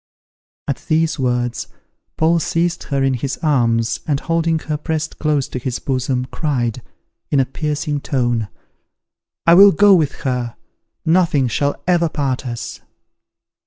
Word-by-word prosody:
At 140 Hz, -4 st, -1 dB
these 160 Hz, 0 st, +1 dB
words 120 Hz, -2 st, -1 dB, 0.5 s
Paul 165 Hz, +1 st, +3 dB
seized 170 Hz, +1 st, -1 dB
her 140 Hz, -2 st, -1 dB
in 135 Hz, -1 st, +2 dB
his 130 Hz, +2 st, -3 dB
arms, 115 Hz, -6 st, +1 dB
and, 145 Hz, -3 st, +1 dB
holding 165 Hz, 0 st, 0 dB
her 155 Hz, -1 st, -3 dB
pressed 155 Hz, 0 st, -3 dB
close 150 Hz, -3 st, +1 dB
to 125 Hz, -, -4 dB
his 125 Hz, 0 st, -3 dB
bosom, 130 Hz, -1 st, -1 dB
cried, 125 Hz, -6 st, -1 dB, 0.5 s
in 140 Hz, -, +2 dB
a 135 Hz, -, +3 dB
piercing 150 Hz, +1 st, -2 dB
tone, 120 Hz, -7 st, -1 dB, 1.0 s
"I 170 Hz, -, +7 dB
will 200 Hz, +3 st, +9 dB
go 205 Hz, 0 st, +5 dB
with 155 Hz, -6 st, +3 dB
her, 125 Hz, -3 st, -2 dB, 0.5 s
nothing 160 Hz, -6 st, +3 dB
shall 140 Hz, +5 st, 0 dB
ever 170 Hz, -2 st, +3 dB
part 135 Hz, -3 st, -2 dB
us." 120 Hz, -1 st, -6 dB
145 Hz, 140 wpm, -19 LUFS, 125-160 Hz, 1.0 s, will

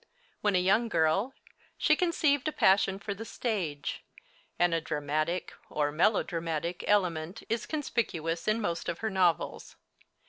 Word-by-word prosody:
When 205 Hz, -2 st, +2 dB
a -, -, +5 dB
young 210 Hz, +6 st, +3 dB
girl 195 Hz, +8 st, +1 dB, 0.4 s
she 310 Hz, -, +4 dB
conceived 310 Hz, -5 st, +1 dB
a -, -, +1 dB
passion 195 Hz, -5 st, +3 dB
for 200 Hz, +1 st, -4 dB
the 205 Hz, +3 st, -7 dB
stage, 190 Hz, -, -3 dB, 0.5 s
and 175 Hz, -1 st, +3 dB
a 165 Hz, -, +1 dB
dramatic 155 Hz, +3 st, -2 dB, 0.2 s
or 145 Hz, -1 st, 0 dB
melodramatic 170 Hz, -1 st, 0 dB
element 180 Hz, -3 st, +1 dB
is 230 Hz, 0 st, -1 dB
conspicuous 175 Hz, -, -2 dB
in 215 Hz, +1 st, +2 dB
most 170 Hz, -6 st, -2 dB
of 170 Hz, -, -2 dB
her 220 Hz, -, 0 dB
novels. 180 Hz, -3 st, 0 dB
185 Hz, 140 wpm, -30 LUFS, 165-220 Hz, 0.5 s, a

